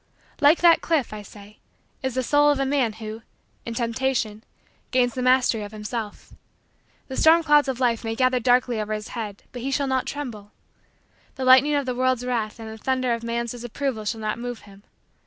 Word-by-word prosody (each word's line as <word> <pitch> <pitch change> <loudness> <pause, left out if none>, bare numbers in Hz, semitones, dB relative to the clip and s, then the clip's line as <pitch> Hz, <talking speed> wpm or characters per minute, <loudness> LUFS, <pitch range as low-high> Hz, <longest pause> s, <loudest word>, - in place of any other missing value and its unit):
Like 295 +3 +5
that 340 -1 +6
cliff, 305 -9 0
I 210 - -6
say, 205 0 -14 0.4
is 260 -2 -3
the 260 - 0
soul 290 +3 +4
of 290 -2 +2
a 275 - +1
man 265 -5 +1
who, 220 0 -8 0.5
in 230 - -4
temptation, 230 -2 -1 0.5
gains 245 -2 +2
the 255 - -4
mastery 255 -3 +3
of 205 0 -7
himself. 215 0 -6 0.7
The 265 - -6
storm 330 +3 +5
clouds 295 -2 +4
of 260 -2 -3
life 240 -3 +1
may 225 0 -3
gather 255 +1 +2
darkly 245 -1 +2
over 215 0 -3
his 215 0 -5
head 210 -4 -6
but 245 - -7
he 265 - -3
shall 280 +1 0
not 260 -1 -1
tremble. 230 -8 -6 0.8
The 265 - -3
lightning 260 +3 +6
of 285 -1 0
the 255 - -2
world's 255 0 0
wrath 230 -3 -2
and 225 - -8
the 220 0 -9
thunder 255 0 0
of 230 - -3
man's 235 0 -3
disapproval 245 -1 -4
shall 220 +1 -3
not 215 +1 -2
move 245 -1 -5
him. 200 -1 -16
245 Hz, 200 wpm, -24 LUFS, 220-265 Hz, 0.8 s, that